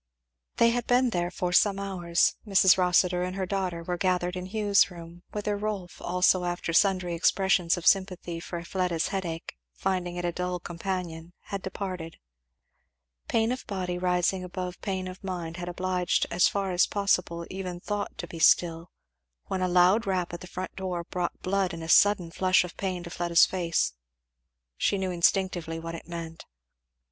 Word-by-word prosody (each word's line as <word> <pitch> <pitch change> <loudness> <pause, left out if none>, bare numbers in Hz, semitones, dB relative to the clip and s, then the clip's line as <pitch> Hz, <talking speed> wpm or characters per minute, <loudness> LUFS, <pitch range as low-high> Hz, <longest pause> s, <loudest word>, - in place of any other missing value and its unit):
They 230 0 +5
had 240 0 -2
been 250 0 +3
there 175 -2 0
for 180 0 -3
some 200 +1 +4
hours. 180 -4 +1
Mrs. 195 -3 +5
Rossitur 180 -1 +3
and 180 +1 -3
her 190 -1 -1
daughter 185 -3 -2
were 175 +1 -3
gathered 180 -1 0
in 180 0 -5
Hugh's 205 -1 +3
room; 170 -1 -11
whither 210 0 -2
Rolf 205 -3 -4
also 180 +1 +2
after 175 -1 -2
sundry 185 -1 +3
expressions 180 0 +2
of 175 - -7
sympathy 185 -3 +2
for 170 0 -6
Fleda's 175 -2 -1
headache, 170 - -4 0.2
finding 180 - -2
it 175 0 -3
a 175 - 0
dull 180 +1 -3
companion, 175 -1 -5
had 200 -1 -5
departed. 185 -4 -5 1.1
Pain 225 +1 +1
of 255 - -3
body 180 -3 -3
rising 180 +1 +1
above 180 0 -6
pain 190 -2 -3
of 185 +1 -9
mind 175 -3 -4
had 175 0 -5
obliged 180 0 0
as 175 +1 +4
far 195 -1 -1
as 180 0 +3
possible 180 -4 0
even 185 -2 -5
thought 205 +2 -4
to - - -5
be 165 -1 -9
still; 165 +1 +3 0.6
when 190 - -1
a 185 - +2
loud 180 +5 +4
rap 180 -3 -1
at 175 - -6
the 180 - -9
front 185 +1 -6
door 180 -2 -3
brought 175 0 -3
the - - -12
blood 190 -2 +1
in 165 - -7
a - - -6
sudden 180 0 +4
flush 185 +1 +3
of 180 - -8
pain 185 -3 -3
to 170 - -8
Fleda's 170 -1 +4
face. 170 - 0 0.8
She 200 - +1
knew 190 -1 -2
instinctively 175 -2 +1
what 165 0 -6
it 165 - -8
meant. 165 -1 -7
180 Hz, 175 wpm, -27 LUFS, 175-190 Hz, 1.1 s, They